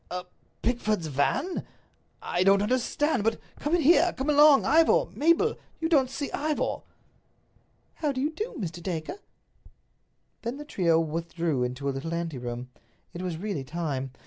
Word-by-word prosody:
"A 180 +1 -4 0.4
Pickford's 215 -6 0
van? 160 - 0 0.6
I 175 - 0
don't 195 +1 +5
understand. 255 +3 0
But 225 +1 0 0.2
come 295 +4 +1
in 345 - +1
here. 345 +3 +5
Come 270 +3 0
along, 295 -1 +7
Ivor. 330 +10 +4
Mabel, 335 +9 +2 0.2
you 325 - 0
don't 275 -6 +4
see 280 +2 -4
Ivor." 300 +1 -1 1.1
"How 300 -3 -1
do 260 - -4
you 295 +4 0
do, 425 +9 -5
Mr. 175 -5 -5
Dacre?" 170 - -4 1.2
Then 235 +3 -4
the 295 - -8
trio 170 - +2
withdrew 165 -2 -2
into 125 +3 -3
a - - +2
little 165 +5 -4
anteroom; 125 -7 -5 0.4
it 175 - -6
was 180 -3 -3
really 195 -6 -3
time. 140 -3 -3
205 Hz, 150 wpm, -27 LUFS, -, 1.2 s, along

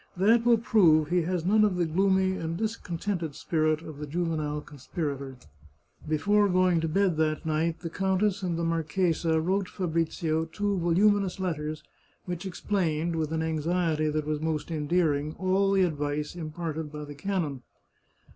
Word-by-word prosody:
That 225 +5 +4
will 240 -1 +6
prove 165 -9 +4
he 180 0 +2
has 180 -3 -1
none 215 +3 +4
of 205 -3 +2
the 175 -1 +1
gloomy 190 +3 +2
and 165 -1 -3
discontented 180 -6 -3
spirit 155 -1 0
of 155 -3 -9
the 150 - -5
juvenile 155 -2 -2
conspirator." 140 -2 -5 0.7
Before 205 +7 +3
going 185 -2 +3
to 165 - -1
bed 180 0 +1
that 155 0 0
night, 160 +1 0
the 170 - -4
countess 195 +2 0
and 175 -3 -1
the 170 - -2
marchesa 165 0 +1
wrote 185 +3 0
Fabrizio 165 -2 -1
two 205 +5 -2
voluminous 195 +3 +2
letters, 155 -4 -3 0.4
which 175 +1 -4
explained, 170 -4 -1
with 160 -1 -1
an 160 0 -1
anxiety 160 0 0
that 150 0 -1
was 150 0 -2
most 160 0 -2
endearing, 155 -1 0
all 190 +1 +2
the 195 -1 +4
advice 150 -3 -2
imparted 160 -2 -5
by 150 -1 -6
the 145 - -8
canon. 150 -4 -2
165 Hz, 155 wpm, -28 LUFS, 155-185 Hz, 0.7 s, will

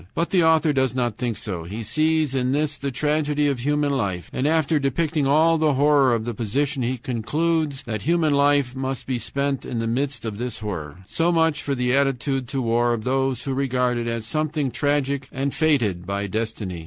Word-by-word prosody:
But 170 - -1
the 180 -3 +4
author 160 -1 +4
does 130 -2 +1
not 120 -4 -1
think 120 -4 -2
so. 90 -6 -5
He 105 +7 -6
sees 155 +4 +1
in 130 -1 0
this 150 0 0
the 140 - -2
tragedy 150 +2 0
of 140 -3 0
human 145 +2 +1
life, 100 -10 -2
and 130 - 0
after 160 -1 +2
depicting 145 +1 0
all 160 +3 +4
the 155 -3 +2
horror 140 -3 +4
of 110 -1 -3
the 120 - -3
position 130 +6 -1
he 125 +2 -1
concludes 145 +5 -1
that 110 -4 -4
human 160 - +2
life 140 -2 +3
must 130 0 -3
be 130 -2 -2
spent 140 +1 -2
in 120 - -5
the 115 - -1
midst 125 0 -2
of 110 -2 -4
this 125 -1 -4
horror. 90 -5 -6
So 165 - 0
much 160 -3 +2
for 140 - -2
the 125 0 +1
attitude 135 -1 0
to 135 0 -2
war 120 +1 +2
of 110 - -6
those 135 0 0
who 135 - -2
regard 125 -2 0
it 120 - -3
as 115 -1 -3
something 155 +1 -1
tragic 140 +1 -1
and 135 +1 -2
fated 110 - +1
by 100 +1 -2
destiny. 105 -3 -3
135 Hz, 205 wpm, -23 LUFS, 120-150 Hz, -, the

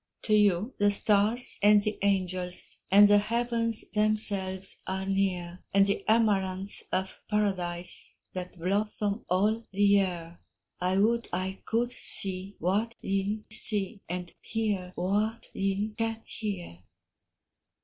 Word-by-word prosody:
To 215 - 0
you 210 +2 +3
the 205 0 +4
stars 210 +4 +2
and 205 0 +6
the 210 0 -2
angels, 185 -2 +2
And 205 +2 +8
the 205 0 +6
heavens 230 +1 -1
themselves 200 -3 +2
are 190 0 -3
near, 185 -2 -2
And 195 0 +6
the 200 - -1
amaranths 200 -3 +1
of 190 +1 -3
paradise, 180 -4 -1 0.2
That 180 0 -6
blossom 205 +4 0
all 210 +5 +1
the 200 +1 0
year: 180 -4 +1 0.4
I 185 +1 0
would 230 +3 +1
I 185 +2 -3
could 240 +2 0
see 195 -3 -1
what 210 +7 -1
ye 195 +2 -2
see, 205 -2 -2
And 180 0 -5
hear 205 -5 -2
what 210 +5 -1
ye 195 +2 -1
can 225 0 -3
hear. 185 - -6
200 Hz, 125 wpm, -28 LUFS, 185-215 Hz, 0.4 s, And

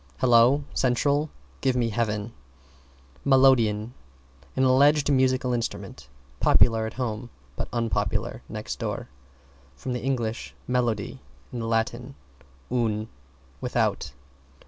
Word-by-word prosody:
"Hello, 125 +3 +5
Central! 140 +4 +1 0.3
Give 130 -2 +2
me 120 -2 +1
Heaven!" 105 0 -2 0.9
=MELODEON= 125 -5 +4 0.6
An 130 - +2
alleged 140 +3 +4
musical 130 -1 +2
instrument, 70 - -4 0.3
popular 115 -2 +4
at 110 - -7
home, 120 -2 -3 0.3
but - - -4
unpopular 115 -2 -1
next - - -5
door. - - -4 0.7
From 125 - -4
Eng. 125 -3 -1 0.3
melody, 120 -5 -1 0.3
and 115 -2 -4
Latin, 120 +3 -1 0.6
un, 110 -3 0 0.5
without. 70 - 0
120 Hz, 100 wpm, -26 LUFS, 115-130 Hz, 0.9 s, Hello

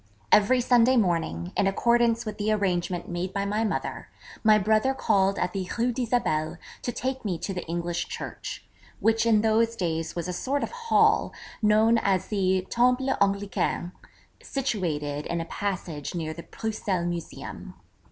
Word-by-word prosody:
Every 245 +5 +5
Sunday 245 +1 +4
morning, 165 - 0
in 200 - +2
accordance 235 +3 +2
with 215 -1 -5
the 210 +1 +1
arrangement 180 -4 0
made 175 +1 -3
by 200 0 -1
my 210 +2 0
mother, 215 - -3 0.4
my 215 -1 +6
brother 220 +6 +2
called 200 -5 +2
at 180 - -1
the 190 -2 -3
Rue 240 +2 +2
d'Isabelle 215 -10 0 0.2
to 245 - -2
take 260 +2 -3
me 190 -5 -1
to 195 - -4
the 180 - -4
English 170 +1 -2
Church, - - -6 0.3
which 225 +1 +2
in 215 -2 +5
those 225 +1 +2
days 165 -5 -2
was 170 0 -3
a 180 - -3
sort 275 +9 -1
of - - -3
hall, 470 -1 +2 0.3
known 220 +2 +4
as 190 -3 0
the 190 -3 +1
'Temple 250 +2 +2
Anglican,' 200 -3 0 0.5
situated 160 - -2
in 170 - -2
a 165 - -3
passage 175 -6 -4
near 160 -2 -3
the 170 - -8
Bruxelles 200 -3 -3
Museum. 175 -1 -6
200 Hz, 160 wpm, -26 LUFS, 175-230 Hz, 0.5 s, my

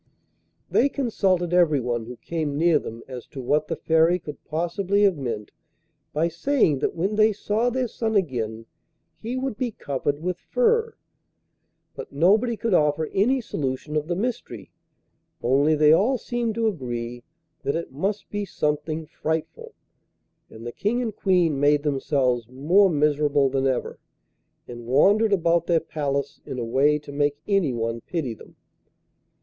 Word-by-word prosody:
They 280 - +3
consulted 190 -10 0
everyone 130 -10 +2
who 125 0 -8
came 155 -2 -3
near 165 -1 +4
them 115 +1 -8
as 125 -2 -8
to 135 - -9
what 150 +4 0
the 165 - -2
Fairy 160 +2 +3
could 150 -4 -10
possibly 190 +5 0
have 195 -3 +4
meant 115 -7 -5 0.6
by 155 +3 +1
saying 170 - +1
that - - -1
when 195 +5 -1
they 215 0 +5
saw 215 +3 0
their 255 0 -1
son 220 0 -2
again 115 - -1 0.5
he 235 +4 -4
would 260 -4 -3
be 255 -2 -1
covered 145 - -3
with 180 +2 -3
fur. 465 -1 +1 1.0
But - - -8
nobody 210 - +3
could 230 -2 -1
offer 150 -1 +2
any 250 +7 +2
solution 145 - -4
of 150 0 -1
the 175 - -1
mystery, 190 - -4 0.7
only 140 +5 +3
they 150 0 +5
all 240 +10 +3
seemed 235 -1 -2
to 230 -1 0
agree 120 - -3 0.4
that 140 - -1
it 170 - -4
must 195 +10 -3
be 205 0 -2
something 155 -2 -2
frightful, 160 +1 -4 0.7
and 110 +1 -11
the 120 - -4
King 235 - -1
and 220 -4 -4
Queen 175 -7 +2
made 145 0 +3
themselves 135 -5 0
more 170 +10 +3
miserable 145 -2 +2
than 135 0 +1
ever, 130 -2 -2 0.7
and 120 -1 -9
wandered 205 - +4
about 170 -3 +2
their 170 -2 +3
palace 140 -3 -3
in 130 - -6
a 120 - -2
way 140 +6 +3
to 150 -1 -11
make 145 0 0
anyone 120 - 0
pity 150 -7 -3
them. 110 - -16
155 Hz, 155 wpm, -24 LUFS, 140-200 Hz, 1.0 s, they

